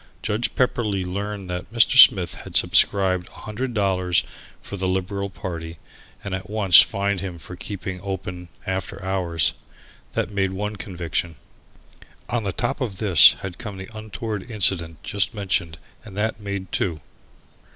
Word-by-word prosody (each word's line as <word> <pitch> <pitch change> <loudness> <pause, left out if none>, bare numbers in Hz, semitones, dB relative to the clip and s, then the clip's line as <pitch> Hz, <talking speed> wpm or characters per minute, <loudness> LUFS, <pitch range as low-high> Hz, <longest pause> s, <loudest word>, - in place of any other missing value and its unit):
Judge 110 +2 -1
Pepperleigh 110 -7 0
learned 100 +1 -4
that 90 +2 -5
Mr. 120 +4 +4
Smith 95 -9 +8
had - - -10
subscribed 95 -3 +3
a - - -14
hundred 120 +5 -4
dollars 95 -4 +1 0.4
for - - -8
the 95 -1 -2
Liberal 95 +2 -2
party 85 -3 -7 0.5
and 95 - -5
at 95 +1 -5
once 100 -5 +7
fined 100 0 -1
him 90 -3 -5
for 90 +2 -10
keeping 95 -1 -6
open 90 -2 -6 0.2
after 95 +1 -3
hours. 90 -4 0 0.6
That - - -2
made 95 -2 0
one 105 +2 -3
conviction. 85 -3 -3 0.9
On 120 -2 -1
the 100 - -1
top 120 +7 -2
of 110 -7 -3
this 95 -7 +7
had 95 -3 -7
come 105 -3 -7
the 95 +4 -10
untoward 110 0 -5
incident 90 -7 +2
just 100 +2 0
mentioned 95 -5 -1 0.3
and 100 -2 -11
that 110 +1 -1
made 100 -2 -5
two. 85 -5 -1
95 Hz, 150 wpm, -23 LUFS, 90-105 Hz, 0.9 s, Smith